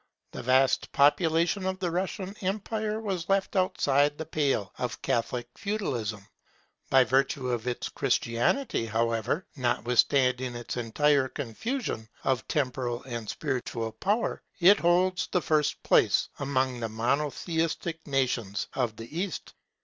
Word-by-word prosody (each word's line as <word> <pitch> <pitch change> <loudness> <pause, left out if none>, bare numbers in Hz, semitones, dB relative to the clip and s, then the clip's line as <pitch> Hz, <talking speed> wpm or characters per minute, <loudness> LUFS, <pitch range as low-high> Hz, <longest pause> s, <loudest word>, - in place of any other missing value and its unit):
The - - -6
vast 130 +2 +3
population 165 +6 +3
of 190 0 -1
the 180 -3 -2
Russian 190 +2 -3
empire 215 +2 -2
was 195 -5 -3
left 195 +1 +1
outside 145 -6 +2
the 160 - -4
pale 140 - 0
of - - -3
Catholic 120 +1 -1
Feudalism. 120 - -3 0.6
By 135 -1 +6
virtue 130 0 +1
of 120 0 -2
its 125 - -2
Christianity, 115 - 0
however, 115 - 0
notwithstanding 125 0 +2
its 120 0 -5
entire 135 +4 +2
confusion 145 - -4
of 130 -4 0
temporal 125 -4 -1
and 120 -4 -6
spiritual 125 -5 -3
power, 205 - -1 0.2
it 195 +4 +7
holds 180 +1 +2
the 180 - +3
first 155 -3 0
place - - +3
among 130 -2 0
the 115 -1 -3
Monotheistic 155 +7 -1
nations 125 -7 -1
of 120 -4 -1
the 115 +7 -10
East. 190 -1 -4
140 Hz, 125 wpm, -28 LUFS, 120-180 Hz, 0.6 s, it